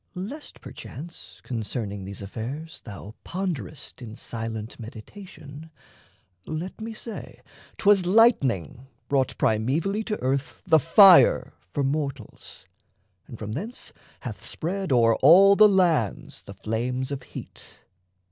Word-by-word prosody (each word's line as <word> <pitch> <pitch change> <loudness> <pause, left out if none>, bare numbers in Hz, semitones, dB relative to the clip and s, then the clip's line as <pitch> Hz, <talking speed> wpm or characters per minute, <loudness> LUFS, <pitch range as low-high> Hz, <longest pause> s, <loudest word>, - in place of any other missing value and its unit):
Lest, 230 +12 -7
perchance, 165 +4 -10
Concerning 110 -4 -4
these 100 +1 -8
affairs 130 +11 -7
thou 105 -1 -9
ponderest 170 -7 -5
In 110 -2 -8
silent 115 -1 -6
meditation, 145 - -11 0.8
let 170 +7 -5
me 225 +1 -5
say 225 0 -8 0.4
'Twas 200 -3 +4
lightning 135 - +3 0.2
brought 135 -2 0
primevally 145 - 0
to 210 -2 -3
earth 135 +2 -2
The 160 -3 +5
fire 195 - +6 0.2
for 145 - -1
mortals, 140 -4 -4 0.6
and 115 - -10
from 105 -1 -6
thence 205 - -6 0.3
hath - - -7
spread 185 +2 -4
O'er 115 -3 +4
all 190 +8 +7
the 215 +1 +7
lands 170 - +1
the 100 - -10
flames 125 +6 -3
of 140 -2 -4
heat. - - -11
140 Hz, 120 wpm, -25 LUFS, 115-185 Hz, 0.8 s, all